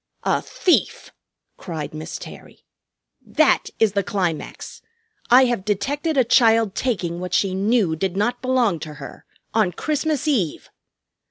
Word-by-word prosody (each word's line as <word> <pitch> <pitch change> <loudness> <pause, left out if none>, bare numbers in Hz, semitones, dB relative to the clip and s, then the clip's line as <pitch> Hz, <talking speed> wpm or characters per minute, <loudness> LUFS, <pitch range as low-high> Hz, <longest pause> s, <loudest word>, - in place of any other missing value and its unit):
"A - - +1
thief!" 360 - 0 0.5
cried 155 -5 -6
Miss 155 0 -6
Terry. - - -13 0.6
"That - - +2
is 220 -2 +3
the 200 - +1
climax. 180 -5 -4 0.5
I 255 +2 +7
have 240 -6 -1
detected 280 - -1
a 260 - +5
child 225 -3 +4
taking 185 -10 -2
what 180 0 -3
she 195 -2 +1
knew 195 -3 +1
did 190 +3 -2
not 240 +4 0
belong 250 -9 +1
to 155 -1 -8
her, - - -11 0.3
on 215 -5 +2
Christmas 310 - -2
Eve! 210 - -1
210 Hz, 140 wpm, -22 LUFS, 180-250 Hz, 0.6 s, I